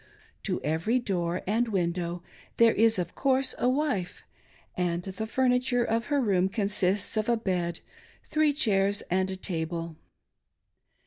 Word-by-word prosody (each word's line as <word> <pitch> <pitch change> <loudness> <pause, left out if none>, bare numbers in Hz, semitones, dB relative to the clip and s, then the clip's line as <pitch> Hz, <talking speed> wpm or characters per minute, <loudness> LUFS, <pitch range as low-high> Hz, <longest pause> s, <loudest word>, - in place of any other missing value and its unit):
To - - -1
every 160 +11 +1
door 180 -6 -2
and 225 +5 +1
window 175 -3 -2 0.3
there 230 -1 +6
is, 225 0 +3
of 175 -2 -3
course, 270 -1 +2
a 250 - +3
wife; 255 -10 -1 0.5
and 175 -1 -1
the 195 +4 -5
furniture 250 0 +2
of 230 0 0
her 290 -1 +1
room 190 -6 +2
consists 200 -1 0
of 215 +2 0
a 235 - +3
bed, 180 -5 -2 0.4
three 310 -1 +2
chairs, 205 -8 +1
and 190 +1 +1
a 190 - -4
table. 165 -3 -4
200 Hz, 140 wpm, -28 LUFS, 180-240 Hz, 0.5 s, there